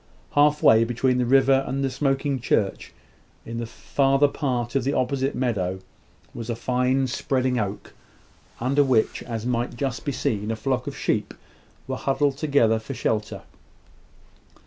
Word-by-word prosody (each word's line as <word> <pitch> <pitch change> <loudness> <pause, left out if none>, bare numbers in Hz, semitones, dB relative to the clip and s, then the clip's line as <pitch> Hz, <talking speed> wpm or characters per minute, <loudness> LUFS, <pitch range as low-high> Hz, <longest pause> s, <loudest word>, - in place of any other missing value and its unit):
Half 150 +1 +3
way 110 +1 +7
between 125 +2 0
the 125 - +1
river 135 +1 +4
and 135 +1 -2
the 135 - 0
smoking 135 0 0
church, 105 -4 -1 0.5
in 115 +1 -5
the 115 - -4
farther 135 +4 +2
part 125 -5 -2
of 135 -2 +1
the 140 +3 0
opposite 135 +1 0
meadow, 100 -8 -1 0.6
was 115 0 -7
a 115 - -1
fine 125 +3 +1
spreading 130 0 0
oak, 105 -1 -4 0.7
under 140 +4 +2
which, 125 -5 +1
as 115 -2 -5
might 120 0 -1
just 130 -1 -3
be 140 - -2
seen, 105 -4 -2
a 115 - -1
flock 130 +1 -2
of - - -5
sheep - - -1 0.5
were - - -3
huddled 135 0 0
together 140 -7 +2
for 130 +5 -7
shelter. 105 -3 -2
130 Hz, 155 wpm, -24 LUFS, 115-135 Hz, 0.7 s, way